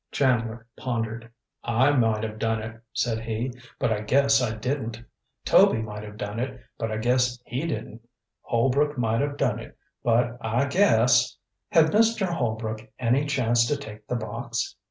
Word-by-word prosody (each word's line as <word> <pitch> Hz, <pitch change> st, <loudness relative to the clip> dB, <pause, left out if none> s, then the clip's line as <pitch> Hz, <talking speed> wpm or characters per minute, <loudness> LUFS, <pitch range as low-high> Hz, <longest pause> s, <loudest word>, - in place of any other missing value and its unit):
Chandler 120 Hz, -4 st, +1 dB
pondered. 115 Hz, -2 st, -3 dB, 0.3 s
"I 120 Hz, +4 st, +3 dB
might 115 Hz, -5 st, +2 dB
have 110 Hz, -1 st, -5 dB
done 115 Hz, 0 st, 0 dB
it," 110 Hz, +1 st, -8 dB
said 115 Hz, -2 st, 0 dB
he; 115 Hz, +2 st, -3 dB, 0.2 s
"but 115 Hz, -, +1 dB
I 105 Hz, -, -3 dB
guess 140 Hz, +4 st, +3 dB
I 110 Hz, -3 st, -1 dB
didn't. 115 Hz, -1 st, -3 dB, 0.5 s
Toby -, -, +5 dB
might 105 Hz, -1 st, -5 dB
have 105 Hz, 0 st, -9 dB
done 105 Hz, +1 st, -4 dB
it; 130 Hz, +3 st, -3 dB, 0.2 s
but 115 Hz, -, -1 dB
I 110 Hz, -, -2 dB
guess 125 Hz, +2 st, +2 dB
he 130 Hz, +8 st, -3 dB
didn't. 115 Hz, -7 st, -5 dB, 0.4 s
Holbrook 135 Hz, +5 st, +1 dB
might 115 Hz, -1 st, +1 dB
have 145 Hz, 0 st, -2 dB
done -, -, +1 dB
it; -, -, -11 dB, 0.2 s
but 120 Hz, +1 st, +1 dB
I 115 Hz, +4 st, +1 dB
guess 130 Hz, -, +4 dB, 0.2 s
" -, -, -57 dB
"Had 160 Hz, -1 st, +5 dB
Mr. 220 Hz, -1 st, +3 dB
Holbrook 110 Hz, -10 st, -2 dB, 0.2 s
any 125 Hz, +4 st, +2 dB
chance 120 Hz, -4 st, +2 dB
to 145 Hz, -, 0 dB
take 110 Hz, -5 st, -10 dB
the 125 Hz, -, -1 dB
box?" 115 Hz, +1 st, -3 dB
120 Hz, 170 wpm, -26 LUFS, 110-130 Hz, 0.5 s, Toby